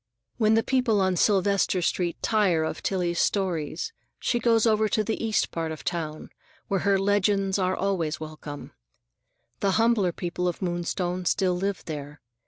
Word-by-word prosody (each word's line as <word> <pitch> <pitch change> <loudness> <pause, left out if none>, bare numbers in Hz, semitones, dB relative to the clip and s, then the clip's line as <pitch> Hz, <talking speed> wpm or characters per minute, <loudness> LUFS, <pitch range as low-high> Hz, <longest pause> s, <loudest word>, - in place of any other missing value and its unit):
When 220 -1 +4
the 225 - +3
people 250 -5 +2
on 190 -1 +2
Sylvester 200 0 +2
Street 175 0 -1
tire 195 -7 +2
of 160 - -3
Tillie's 175 -3 -1
stories, 190 - -1 0.3
she 240 - 0
goes 230 -1 +3
over 215 -1 +3
to 215 - +1
the 225 +2 -3
east 220 -1 +1
part 165 -1 -3
of 155 - -7
town, 155 -3 -4 0.4
where 195 - 0
her 200 0 +2
legends 195 0 +1
are 185 0 +1
always 170 -6 -1
welcome. 155 -2 -8 0.9
The 195 -1 +1
humbler 225 -5 +3
people 180 +1 -3
of 175 - -2
Moonstone 175 0 -2
still 180 +1 +2
live 195 +2 -2
there. 150 -2 -6
190 Hz, 160 wpm, -26 LUFS, 170-210 Hz, 0.9 s, When